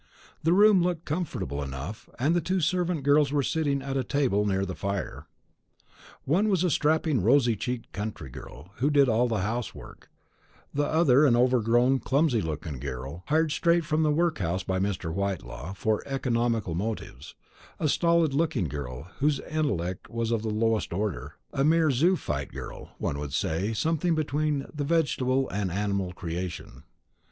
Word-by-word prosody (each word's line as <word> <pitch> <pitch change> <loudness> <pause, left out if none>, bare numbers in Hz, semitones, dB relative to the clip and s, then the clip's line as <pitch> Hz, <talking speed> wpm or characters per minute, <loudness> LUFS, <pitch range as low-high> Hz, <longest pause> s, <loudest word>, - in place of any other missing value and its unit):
The 165 - +2
room 205 0 +6
looked 175 -2 -1
comfortable 125 - -3
enough, 70 +9 -6
and 150 +7 +2
the 175 - +2
two 185 +4 0
servant 175 -2 0
girls 145 0 +4
were 145 -1 +1
sitting 140 -2 0
at 135 -1 -3
a 130 - +1
table 120 -7 +1
near 95 -1 +1
the 95 - -4
fire. 100 +1 -4 1.0
One 190 +10 +2
was 185 -3 +2
a 180 - +2
strapping 155 - +2
rosy 120 +2 +4
cheeked 120 +3 -4
country 100 - -5
girl, 80 +7 -11
who 135 +5 +2
did 140 -2 +5
all 120 +1 +3
the 110 -4 -1
household 115 +1 -3
work; - - -16 0.6
the 145 0 +1
other 150 -4 +4
an 130 -6 +5
overgrown 125 +1 +3
clumsy 135 -4 +2
looking 75 -3 -4
girl, 65 +8 -6
hired 160 0 +2
straight 170 +1 +2
from 155 +1 +1
the 155 - +3
workhouse 150 - 0
by 95 0 -1
Mr. 95 -4 -2
Whitelaw, 90 -5 -3
from 105 +2 0
economical 120 -7 0
motives; 85 - -5 0.4
a 155 - +1
stolid 170 -1 +3
looking 145 - +1
girl, 65 -2 -6 0.2
whose 145 0 +2
intellect 105 - -2
was 115 -1 -2
of 115 -2 +1
the 110 - -3
lowest 110 -3 0
order; 85 -8 -3 0.2
a 135 - +1
mere 160 0 +4
zoophyte 130 - 0
girl, - - -8
one 70 - -2
would 70 -2 -5
say 95 +7 0
something 165 +7 +1
between 150 -1 0
the 150 -2 -3
vegetable 135 -4 +1
and 100 -2 -1
animal 100 -1 -1
creation. 90 -1 -6
125 Hz, 165 wpm, -27 LUFS, 95-155 Hz, 1.0 s, room